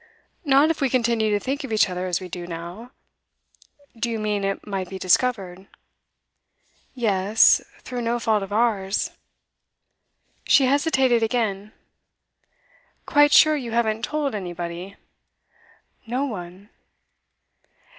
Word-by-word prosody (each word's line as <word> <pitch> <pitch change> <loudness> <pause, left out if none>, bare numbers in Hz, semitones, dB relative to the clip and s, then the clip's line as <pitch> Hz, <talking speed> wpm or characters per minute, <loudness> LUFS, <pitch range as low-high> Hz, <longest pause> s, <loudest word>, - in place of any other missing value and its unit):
'Not 285 +1 +4
if 325 - -5
we 270 - +2
continue 235 -3 +1
to 205 -1 +1
think 275 +6 -3
of 270 - -7
each 215 -1 +3
other 180 0 -4
as 175 -2 -1
we 185 - -8
do 175 0 -7
now. 175 +7 -8 1.1
Do 235 +1 -2
you 230 - -2
mean 210 -2 -2
it 195 0 -3
might 195 -3 -4
be 190 - -6
discovered?' 190 -1 0 1.3
'Yes, 210 -3 +3 0.2
through 250 -1 -5
no 235 +1 -1
fault 220 -3 +1
of 195 0 -7
ours.' 210 -3 0 1.4
She 275 - +5
hesitated 265 -3 +2
again. 215 -3 -1 1.3
'Quite 290 0 +4
sure 310 +1 +6
you 245 -6 -5
haven't 220 -2 0
told 290 +2 -2
anybody?' 175 -1 -6 1.1
'No 255 +4 -1
one. 190 -4 -8
220 Hz, 125 wpm, -23 LUFS, 190-250 Hz, 1.4 s, sure